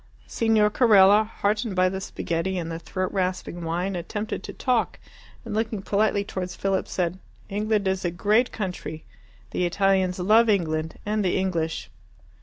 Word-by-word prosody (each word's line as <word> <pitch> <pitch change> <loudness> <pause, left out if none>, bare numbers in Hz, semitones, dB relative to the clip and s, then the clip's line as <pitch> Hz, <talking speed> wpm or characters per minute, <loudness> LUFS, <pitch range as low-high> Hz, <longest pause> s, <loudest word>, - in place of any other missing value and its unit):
Signor 220 -2 +2
Carella, 210 -3 +6
heartened 210 0 -1
by 185 0 +4
the 190 +1 -3
spaghetti 185 +1 -2
and 165 -1 -3
the 165 - -4
throat 185 +2 -3
rasping 185 -2 -2
wine, 175 +4 -2
attempted 210 +5 -4
to - - -7
talk, 250 -4 0 0.5
and, 225 - -5
looking 220 -2 -2
politely 205 0 +1
towards 180 -3 -5
Philip, 195 -1 -1
said, 180 0 -2 0.3
"England 210 0 0
is 190 0 0
a 175 - +1
great 210 +8 +2
country. 180 -6 -5 0.5
The - - -1
Italians 190 0 +2
love 215 +5 +4
England 160 -5 0
and 210 0 0
the 185 - +1
English." 170 -4 -2
190 Hz, 155 wpm, -25 LUFS, 180-210 Hz, 0.5 s, Carella